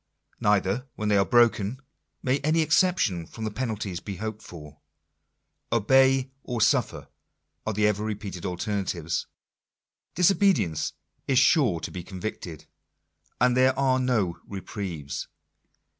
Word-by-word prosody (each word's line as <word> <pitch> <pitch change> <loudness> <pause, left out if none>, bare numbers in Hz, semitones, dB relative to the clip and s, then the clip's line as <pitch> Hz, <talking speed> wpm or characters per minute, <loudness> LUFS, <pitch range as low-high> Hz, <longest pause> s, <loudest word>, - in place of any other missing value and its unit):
Neither, 105 +5 +1
when 105 -1 -2
they 105 - +4
are 100 - +5
broken, 120 -1 +3 0.4
may 130 +2 +1
any 155 +3 +2
exception 155 - +2
from 110 -1 -6
penalties 110 -7 -3
be 100 +2 -6
hoped 110 +2 -5
for. 75 -3 -12 0.5
" - - -51
Obey 130 +4 +4
or 120 -3 -4
suffer" 105 - +1 0.6
are 110 - 0
the 105 +1 +1
ever 105 0 +1
repeated 100 -4 -5
alternatives. 90 -3 -2 0.9
Disobedience 180 - +2 0.3
is 135 - +2
sure 125 - +4
to - - -5
be 90 - -6
convicted. 90 -4 -7 0.7
And 125 +1 +3
there 130 +1 +3
are 130 -1 +2
no 110 -9 0
reprieves. 90 -8 -5
105 Hz, 125 wpm, -26 LUFS, 95-130 Hz, 0.9 s, are